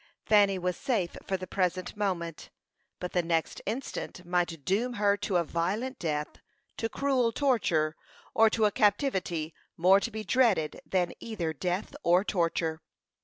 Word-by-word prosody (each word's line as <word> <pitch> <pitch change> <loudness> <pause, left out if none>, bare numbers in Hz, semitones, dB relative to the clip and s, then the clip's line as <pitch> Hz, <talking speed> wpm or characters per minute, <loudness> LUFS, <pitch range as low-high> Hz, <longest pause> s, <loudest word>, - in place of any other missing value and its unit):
Fanny 205 -2 +5
was 180 0 -2
safe 225 -11 -1
for 190 - 0
the 185 - -6
present 185 -1 -1
moment, 175 -6 -3 0.5
but 180 - -4
the 180 - +2
next 165 -1 -1
instant 220 -5 -4
might 175 -4 -1
doom 230 +7 +1
her 205 -2 +3
to 205 -2 -2
a 175 - +4
violent 205 - -2
death, 150 -2 -3 0.4
to 225 - -1
cruel 260 -4 +1
torture, 190 - +1 0.4
or 225 0 +6
to 220 0 +2
a 210 - +3
captivity 190 - +1 0.2
more 185 +4 +6
to 215 - -3
be 220 -1 -5
dreaded 210 - +2
than 180 -2 +1
either 175 -8 -3
death 180 - -2
or 180 -2 +4
torture. 165 -4 0
185 Hz, 155 wpm, -29 LUFS, 170-220 Hz, 0.5 s, or